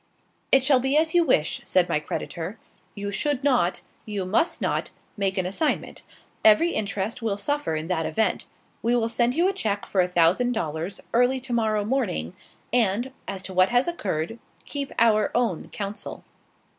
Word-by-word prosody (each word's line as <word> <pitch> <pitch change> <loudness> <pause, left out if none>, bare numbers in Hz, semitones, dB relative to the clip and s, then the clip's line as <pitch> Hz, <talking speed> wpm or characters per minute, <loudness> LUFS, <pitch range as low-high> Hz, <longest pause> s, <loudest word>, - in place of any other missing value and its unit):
"It 270 -1 +6
shall 265 -1 +4
be 265 +3 +1
as 320 +1 +2
you 350 -1 +5
wish," 205 - +1
said 180 -1 +2
my 150 - +1
creditor. 170 +5 -5 0.4
"You 200 -1 -4
should 285 +5 -1
not, 220 -11 +2 0.2
you 205 -3 -4
must 215 - +1
not, - - -1 0.3
make 195 -2 -1
an 185 - +1
assignment; 200 - -1 0.4
every 220 +11 +6
interest 210 - -2
will 215 -3 -1
suffer 290 - -1
in 155 0 -3
that 165 -2 -1
event. 220 -1 0 0.3
We 235 +1 +2
will 230 -1 +1
send 240 +2 +1
you 345 +3 +3
a 390 - +1
check 205 - -2
for 190 - +1
a 180 - +1
thousand 180 +8 +3
dollars 165 -3 -3
early 250 +2 +3
to 250 -1 -5
morrow 215 -3 +1
morning, 210 - -1 0.4
and, 240 +2 +2 0.2
as 190 -1 -5
to 190 - -7
what 185 +1 +4
has 245 +4 +2
occurred, 210 - -3 0.3
keep 280 -1 -4
our 215 -2 +4
own 235 -9 0
counsel." 200 0 -6
215 Hz, 175 wpm, -25 LUFS, 185-250 Hz, 0.4 s, It